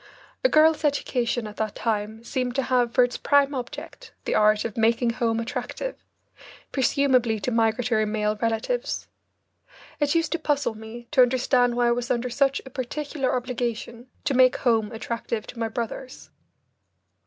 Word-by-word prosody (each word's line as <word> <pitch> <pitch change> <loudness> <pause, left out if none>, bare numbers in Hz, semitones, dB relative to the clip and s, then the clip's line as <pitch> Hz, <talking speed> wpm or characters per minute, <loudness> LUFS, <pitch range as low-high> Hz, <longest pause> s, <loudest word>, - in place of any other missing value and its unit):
A - - +5
girl's 315 -2 +4
education 245 -5 0
at 210 0 -9
that 215 -2 -2
time 220 0 -2
seemed 250 0 -2
to 270 - +1
have 245 -2 +2
for 250 - +5
its 245 0 -1
prime 285 0 +3
object 250 -2 -7
the - - 0
art 210 0 +3
of 225 - -4
"making 230 +1 +2
home 230 -1 0
attractive" 260 - -5 0.7
presumably 255 -3 +2
to 250 - -2
migratory 225 0 +2
male 210 0 0
relatives. 230 - -2 0.9
It 290 +1 +1
used 330 -1 +1
to 335 - 0
puzzle 290 -6 0
me 220 +2 -10
to 270 - +5
understand 245 -1 +3
why 240 0 +3
I - - +3
was 245 +1 -1
under 250 0 -1
such 275 +2 +1
a 265 - -10
particular 275 +2 -2
obligation 240 -1 -4 0.2
to 290 - 0
make 255 0 +5
home 225 -4 +1
attractive 230 -1 -4
to 240 - -10
my 225 - 0
brothers. 235 +3 -6
245 Hz, 160 wpm, -25 LUFS, 225-265 Hz, 0.9 s, A